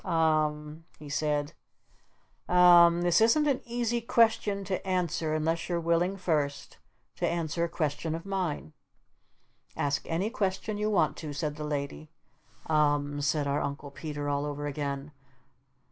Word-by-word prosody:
"U -, -, -11 dB
m 160 Hz, -2 st, +3 dB
m," 150 Hz, +2 st, -11 dB
he 150 Hz, -1 st, -11 dB
said. 145 Hz, 0 st, -1 dB, 1.0 s
"U 180 Hz, -, 0 dB
m -, -, +5 dB
mmmm. 175 Hz, -1 st, +7 dB
That 175 Hz, +3 st, +3 dB
isn't 265 Hz, +7 st, +4 dB
an 275 Hz, -3 st, +1 dB
easy 240 Hz, 0 st, -1 dB
question 220 Hz, -3 st, +2 dB
to 190 Hz, -1 st, -3 dB
answer 175 Hz, -4 st, -1 dB
unless 165 Hz, +3 st, -1 dB
you're 175 Hz, -1 st, 0 dB
willing 170 Hz, +3 st, +1 dB
first 150 Hz, -6 st, -2 dB, 0.4 s
to -, -, 0 dB
answer 170 Hz, 0 st, -1 dB
a -, -, -5 dB
question 155 Hz, 0 st, -2 dB
of 165 Hz, -, -7 dB
mine." 180 Hz, -, -3 dB, 1.0 s
"Ask 140 Hz, -1 st, 0 dB
any 185 Hz, +7 st, -1 dB
question 205 Hz, 0 st, -2 dB
you 210 Hz, 0 st, 0 dB
want 155 Hz, -7 st, +2 dB
to," 150 Hz, -3 st, -6 dB
said 150 Hz, 0 st, -3 dB
the 150 Hz, -, -6 dB
Lady. 150 Hz, +1 st, -4 dB, 0.6 s
"U 160 Hz, -, -2 dB
m 145 Hz, -1 st, +2 dB
m," -, -, -3 dB
said 145 Hz, +1 st, +1 dB
our 140 Hz, +1 st, 0 dB
Uncle 140 Hz, 0 st, -5 dB
Peter 145 Hz, 0 st, -5 dB
all 145 Hz, 0 st, 0 dB
over 145 Hz, 0 st, -4 dB
again. 140 Hz, 0 st, -4 dB
160 Hz, 165 wpm, -29 LUFS, 145-180 Hz, 1.0 s, mmmm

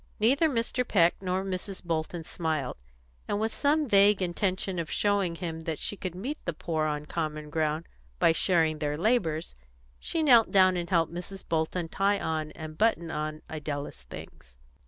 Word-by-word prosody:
Neither 275 Hz, +9 st, +4 dB
Mr. 245 Hz, -1 st, 0 dB
Peck 175 Hz, -8 st, +4 dB
nor 185 Hz, 0 st, -1 dB
Mrs. 190 Hz, +1 st, -4 dB
Bolton 165 Hz, 0 st, -2 dB
smiled, 155 Hz, -6 st, -2 dB, 0.5 s
and 205 Hz, -, -1 dB
with 220 Hz, +1 st, -1 dB
some 300 Hz, +1 st, +2 dB
vague 200 Hz, -1 st, +5 dB
intention 185 Hz, 0 st, -1 dB
of 165 Hz, -, -3 dB
showing 200 Hz, -4 st, +1 dB
him 165 Hz, -2 st, -4 dB
that 160 Hz, -1 st, -3 dB
she 205 Hz, -, -2 dB
could 185 Hz, -3 st, -5 dB
meet 260 Hz, +12 st, -5 dB
the 170 Hz, -, -1 dB
poor 155 Hz, -1 st, -1 dB
on 150 Hz, 0 st, -3 dB
common 155 Hz, -2 st, -4 dB
ground 155 Hz, +1 st, 0 dB, 0.3 s
by 165 Hz, -, +5 dB
sharing 160 Hz, -2 st, +2 dB
their 150 Hz, -1 st, -1 dB
labours, 165 Hz, -, +1 dB, 0.5 s
she 325 Hz, -, -1 dB
knelt 240 Hz, -6 st, +6 dB
down 185 Hz, -1 st, +5 dB
and 175 Hz, -1 st, -3 dB
helped 165 Hz, -3 st, +2 dB
Mrs. 185 Hz, +2 st, -6 dB
Bolton 165 Hz, +1 st, -1 dB
tie 200 Hz, +4 st, +1 dB
on 155 Hz, -1 st, -2 dB
and 155 Hz, -1 st, -8 dB
button 175 Hz, -7 st, +2 dB
on 155 Hz, 0 st, -4 dB
Idella's 145 Hz, -, -5 dB
things. -, -, -12 dB
170 Hz, 170 wpm, -28 LUFS, 155-200 Hz, 0.5 s, knelt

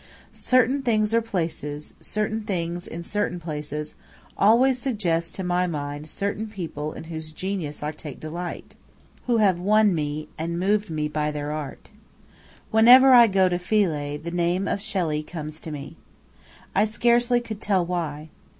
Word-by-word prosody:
Certain 255 Hz, +2 st, +2 dB
things 220 Hz, -4 st, +1 dB
or 230 Hz, -, +4 dB
places, 160 Hz, -8 st, -4 dB
certain 215 Hz, +1 st, -1 dB
things 175 Hz, -4 st, -3 dB
in 170 Hz, +1 st, -6 dB
certain 200 Hz, -1 st, -2 dB
places, 150 Hz, -2 st, -5 dB, 0.4 s
always 250 Hz, +5 st, +4 dB
suggest 175 Hz, -10 st, -1 dB
to 190 Hz, -, -4 dB
my 180 Hz, 0 st, +1 dB
mind 145 Hz, -1 st, -5 dB
certain 200 Hz, +5 st, -3 dB
people 165 Hz, -7 st, -5 dB
in -, -, -8 dB
whose 160 Hz, -1 st, -7 dB
genius 165 Hz, -4 st, -4 dB
I 150 Hz, -, -1 dB
take 150 Hz, -2 st, -9 dB
delight 170 Hz, +3 st, -6 dB, 0.5 s
who 240 Hz, -2 st, +3 dB
have 195 Hz, -5 st, +3 dB
won 210 Hz, +2 st, +4 dB
me, 150 Hz, -1 st, -3 dB
and 170 Hz, +1 st, -2 dB
moved 205 Hz, +2 st, +1 dB
me 155 Hz, -1 st, -1 dB
by 150 Hz, 0 st, -1 dB
their 150 Hz, 0 st, -4 dB
art. 150 Hz, -3 st, -6 dB, 0.8 s
Whenever 250 Hz, +4 st, +8 dB
I 240 Hz, -2 st, +9 dB
go 190 Hz, -2 st, +3 dB
to 175 Hz, -1 st, 0 dB
Philae, 165 Hz, -7 st, 0 dB
the 165 Hz, +3 st, -6 dB
name 175 Hz, +2 st, 0 dB
of 200 Hz, -, -1 dB
Shelley 175 Hz, -8 st, -1 dB
comes 155 Hz, -1 st, -7 dB
to -, -, -7 dB
me. 145 Hz, +2 st, -8 dB, 0.8 s
I -, -, +4 dB
scarcely 240 Hz, +2 st, +2 dB
could 220 Hz, -3 st, -7 dB
tell 190 Hz, -5 st, +1 dB
why. 160 Hz, -3 st, -3 dB
175 Hz, 160 wpm, -24 LUFS, 155-215 Hz, 0.8 s, I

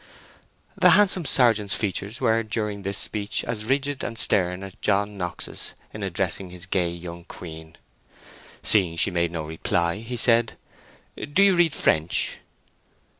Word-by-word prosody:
The -, -, +5 dB
handsome 190 Hz, -4 st, +4 dB
sergeant's 110 Hz, -7 st, +4 dB
features 105 Hz, +1 st, -3 dB
were 115 Hz, -3 st, +2 dB
during 105 Hz, -2 st, -3 dB
this 100 Hz, 0 st, -1 dB
speech 105 Hz, -1 st, -1 dB
as 110 Hz, -2 st, -4 dB
rigid 140 Hz, +2 st, -1 dB
and 115 Hz, -, -5 dB
stern 90 Hz, -2 st, +1 dB
as 95 Hz, -1 st, -8 dB
John 100 Hz, 0 st, +1 dB
Knox's 90 Hz, -3 st, -5 dB, 0.2 s
in 105 Hz, -, -7 dB
addressing 95 Hz, 0 st, -2 dB
his 90 Hz, 0 st, -7 dB
gay 90 Hz, -2 st, 0 dB
young 85 Hz, 0 st, -8 dB
queen. 80 Hz, -1 st, -11 dB, 0.9 s
Seeing 90 Hz, -6 st, +2 dB
she 95 Hz, -, +2 dB
made 85 Hz, -1 st, 0 dB
no 85 Hz, -2 st, -4 dB
reply, 85 Hz, +2 st, -1 dB
he 120 Hz, +2 st, -6 dB
said, 115 Hz, -1 st, +2 dB, 0.7 s
"Do 195 Hz, +7 st, +4 dB
you 195 Hz, -2 st, +5 dB
read 170 Hz, -3 st, +3 dB
French?" 80 Hz, +2 st, +1 dB
100 Hz, 145 wpm, -24 LUFS, 90-115 Hz, 0.9 s, The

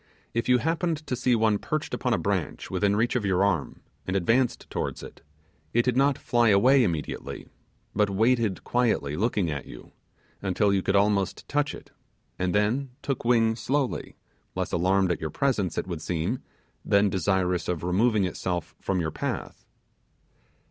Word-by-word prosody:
If 115 Hz, +2 st, -1 dB
you 125 Hz, -, +6 dB
happened 160 Hz, +2 st, -1 dB
to 130 Hz, -, -2 dB
see 125 Hz, 0 st, +2 dB
one 110 Hz, -2 st, +2 dB
perched 155 Hz, -1 st, -3 dB
upon 125 Hz, -, -1 dB
a 115 Hz, -, +3 dB
branch 100 Hz, -4 st, -2 dB
within 100 Hz, +2 st, +1 dB
reach 115 Hz, +4 st, +1 dB
of 125 Hz, -, +1 dB
your 95 Hz, -1 st, +2 dB
arm, 90 Hz, -8 st, -1 dB, 0.3 s
and 95 Hz, -, -1 dB
advanced 115 Hz, +7 st, +1 dB
towards -, -, -3 dB
it, -, -, -11 dB, 0.5 s
it 120 Hz, -, +4 dB
did 125 Hz, -1 st, +1 dB
not 140 Hz, +1 st, +3 dB
fly 120 Hz, -1 st, +2 dB
away 125 Hz, +7 st, +5 dB
immediately, 80 Hz, -8 st, -3 dB, 0.5 s
but 105 Hz, -1 st, +2 dB
waited 110 Hz, 0 st, +1 dB
quietly 115 Hz, -, 0 dB
looking 100 Hz, -4 st, 0 dB
at 70 Hz, -2 st, -5 dB
you, -, -, -12 dB, 0.5 s
until 100 Hz, +1 st, +1 dB
you 95 Hz, -, +2 dB
could 95 Hz, +2 st, 0 dB
almost 100 Hz, -1 st, +1 dB
touch 145 Hz, 0 st, 0 dB
it, -, -, -14 dB, 0.5 s
and 90 Hz, 0 st, 0 dB
then 115 Hz, +7 st, +1 dB
took 135 Hz, -3 st, -2 dB
wing 115 Hz, -2 st, +3 dB
slowly, 135 Hz, +2 st, -2 dB, 0.4 s
less -, -, -2 dB
alarmed 95 Hz, +1 st, +2 dB
at 85 Hz, -, -2 dB
your 80 Hz, -, -2 dB
presence, 105 Hz, -, 0 dB
it -, -, -1 dB
would 85 Hz, -4 st, -5 dB
seem, 90 Hz, +10 st, -2 dB, 0.4 s
than 100 Hz, 0 st, +3 dB
desirous 95 Hz, -1 st, 0 dB
of 85 Hz, -2 st, -2 dB
removing 100 Hz, +3 st, +2 dB
itself 90 Hz, -2 st, -3 dB
from 95 Hz, -1 st, -1 dB
your 80 Hz, -2 st, -1 dB
path. -, -, -5 dB
105 Hz, 170 wpm, -26 LUFS, 90-125 Hz, 0.5 s, you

